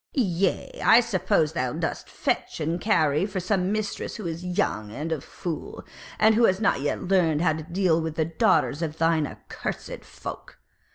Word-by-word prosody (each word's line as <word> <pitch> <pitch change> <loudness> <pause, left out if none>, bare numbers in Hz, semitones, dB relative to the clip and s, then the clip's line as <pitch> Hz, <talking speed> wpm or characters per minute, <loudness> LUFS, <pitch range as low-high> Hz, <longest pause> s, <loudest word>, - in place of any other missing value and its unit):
Yea, 190 - 0
I 225 - +8
suppose 185 -8 +1
thou 125 -3 -1
dost - - -3
fetch - - -2
and 165 +3 -1
carry 155 -5 +2
for 195 -2 -3
some 185 0 0
mistress 215 -1 -3
who 215 - -7
is 170 +1 -4
young 110 - -1
and 150 +8 -4
a 155 -4 -1
fool, 170 +2 -6 0.3
and 220 +1 +5
who 230 +2 +5
has 190 -2 +2
not 220 - +2
yet 145 - -1
learned 175 -4 +2
how 160 -3 +3
to 155 - -5
deal 170 0 +1
with 160 -1 -4
the 160 - +1
daughters 160 -1 +2
of 160 -1 -3
thine 165 -2 +2
accursed - - -6
folk. - - -9
170 Hz, 180 wpm, -25 LUFS, 155-190 Hz, 0.3 s, I